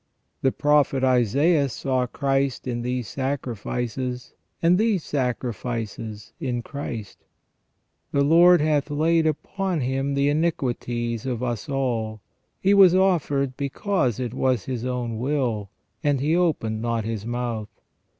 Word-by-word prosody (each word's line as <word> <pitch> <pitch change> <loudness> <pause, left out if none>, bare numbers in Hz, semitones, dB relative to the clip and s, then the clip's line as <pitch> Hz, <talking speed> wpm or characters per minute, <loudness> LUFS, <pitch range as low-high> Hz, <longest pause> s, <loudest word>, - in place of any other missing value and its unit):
The 135 - +3
Prophet 145 -2 +2
Isaias 135 - +3
saw 130 -2 0
Christ 135 0 -1
in 120 -2 -2
these 125 -1 -2
sacrifices, 125 -1 -3 0.3
and 175 +2 +4
these 215 -6 +2
sacrifices 115 -4 -3
in 120 -3 -2
Christ. 120 -8 -6 0.9
'^The 140 0 +2
Lord 175 +2 +7
hath 150 -1 +1
laid 160 +2 +2
upon 175 +3 -2
Him 135 +2 -1
the 140 0 +2
iniquities 125 -6 -1
of 125 -1 -2
us 120 -2 -3
all. 115 -5 -1 0.4
He 195 +1 +3
was 190 -3 +7
offered 145 -8 +2
because 140 - -1
it 125 -2 -3
was 130 -5 0
His 125 -2 -3
own 120 -3 -2
will, 120 -6 -1 0.3
and 145 -2 +2
he 150 +5 +1
opened 135 -11 0
not 115 -1 -1
His 110 -2 -3
mouth. 120 -3 -3
130 Hz, 130 wpm, -24 LUFS, 120-150 Hz, 0.9 s, Lord